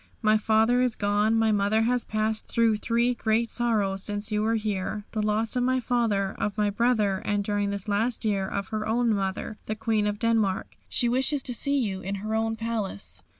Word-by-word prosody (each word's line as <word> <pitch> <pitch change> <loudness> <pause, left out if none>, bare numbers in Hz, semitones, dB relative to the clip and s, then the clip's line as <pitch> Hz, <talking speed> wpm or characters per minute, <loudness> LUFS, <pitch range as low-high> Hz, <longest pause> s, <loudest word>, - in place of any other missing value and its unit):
My 215 0 +4
father 220 +3 +3
is 250 -3 +1
gone. 205 +2 +1
My 225 -1 +3
mother 205 +2 +2
has 245 +1 +1
passed 215 0 -2
through 230 -2 +2
three 235 +3 +1
great 230 0 0
sorrows 210 -5 0
since 205 +2 -2
you 210 0 +1
were 225 +1 +1
here 210 -1 -3
the 215 - -2
loss 215 +3 0
of 250 - +1
my 255 +1 +2
father, 225 -6 0
of 205 +1 -2
my 210 -1 +1
brother, 210 -4 +1
and 205 0 0
during 205 0 -1
this 200 0 -4
last 225 +4 0
year 200 -3 0
of 200 0 -4
her 215 -1 -3
own 230 0 +2
mother, 195 +1 -3
the 215 - -2
Queen 215 -1 0
of 205 0 -2
Denmark. 220 -4 0
She 240 - +2
wishes 265 +4 +2
to 250 - -1
see 280 +4 0
you 200 -7 -1
in 195 +2 -3
her 215 - -2
own 225 0 0
palace." 200 - -4
215 Hz, 205 wpm, -26 LUFS, 205-230 Hz, -, My